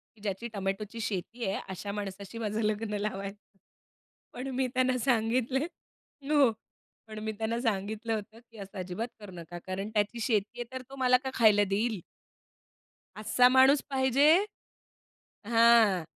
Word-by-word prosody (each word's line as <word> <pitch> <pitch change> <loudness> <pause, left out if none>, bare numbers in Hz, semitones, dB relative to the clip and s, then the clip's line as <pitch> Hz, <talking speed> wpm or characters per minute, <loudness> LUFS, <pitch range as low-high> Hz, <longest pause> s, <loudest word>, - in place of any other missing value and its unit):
की 215 - -22
ज्याची 205 +3 -3
टोमॅटोची 200 +3 -3
शेती 220 +4 -4
आहे 195 +1 -1
अशा 195 +2 -5
माणसाशी 200 +1 -6
माझं 220 0 -2
लग्न 210 0 -1
लावायचं. 200 0 -6 0.8
पण 255 +2 -5
मी 260 -1 +1
त्यांना 255 0 +2
सांगितले, 245 +1 +1 0.7
हो 285 -5 +5 0.6
पण 215 0 -7
मी 220 - -2
त्यांना 225 +1 -1
सांगितलं 220 0 -2
होतं 220 +1 -5
की 225 - -15
"असं 200 0 -9
अजिबात 185 +6 -4
करू 205 -3 -10
नका 170 +1 -8
कारण 195 +2 -3
त्याची 210 +3 0
शेती 215 -1 0
आहे - - -1
तर 260 - -4
तो 275 - -9
मला 255 -1 +4
का 265 - -2
खायला 215 -4 +5
देईल?" 210 +1 0 1.2
असा 225 +4 +4
माणूस 265 +2 +6
पाहिजे 265 +1 +3 1.2
हां, 230 -5 +5
220 Hz, 145 wpm, -29 LUFS, 200-240 Hz, 1.2 s, माणूस